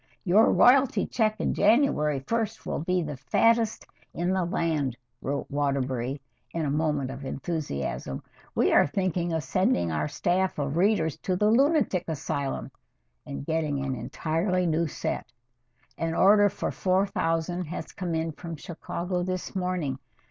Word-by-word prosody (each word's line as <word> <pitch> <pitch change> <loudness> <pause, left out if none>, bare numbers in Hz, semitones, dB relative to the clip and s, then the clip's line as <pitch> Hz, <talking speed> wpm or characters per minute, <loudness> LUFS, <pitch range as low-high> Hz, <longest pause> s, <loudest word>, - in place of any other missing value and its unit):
"Your 205 +4 +5
royalty 265 +2 +5
check 215 -2 +1
on - - 0
January 200 - +3
1st 225 +6 -2
will - - -2
be 180 +3 0
the 150 -3 -5
fattest 230 - +2 0.3
in 175 +2 0
the 190 -1 +1
land," 155 -7 -1 0.2
wrote 140 +1 -2
Waterbury 135 -2 -1 0.4
in 165 -2 0
a 140 - 0
moment 150 -3 0
of 135 +1 -8
enthusiasm. 135 - -4 0.3
"We - - +3
are - - +6
thinking 175 +1 -1
of 160 -1 -1
sending 130 - +1
our 75 -1 -1
staff 185 - 0
of 145 0 -2
readers 175 -4 +2
to 185 - -1
the 210 +3 +3
lunatic 270 - +3
asylum 145 -3 -3 0.6
and 70 0 -6
getting 150 -4 -1
an 135 - -1
entirely 165 - -1
new 165 0 +1
set. - - -4 0.7
An 165 0 -1
order 205 +1 +6
for 200 - -3
four 185 +1 +2
thousand 175 -1 -1
has 165 +3 -6
come 175 -3 -3
in 160 0 -1
from 165 +2 -7
Chicago 175 +3 -4
this 185 +1 -3
morning. 180 -8 -1
165 Hz, 150 wpm, -27 LUFS, 145-185 Hz, 0.7 s, are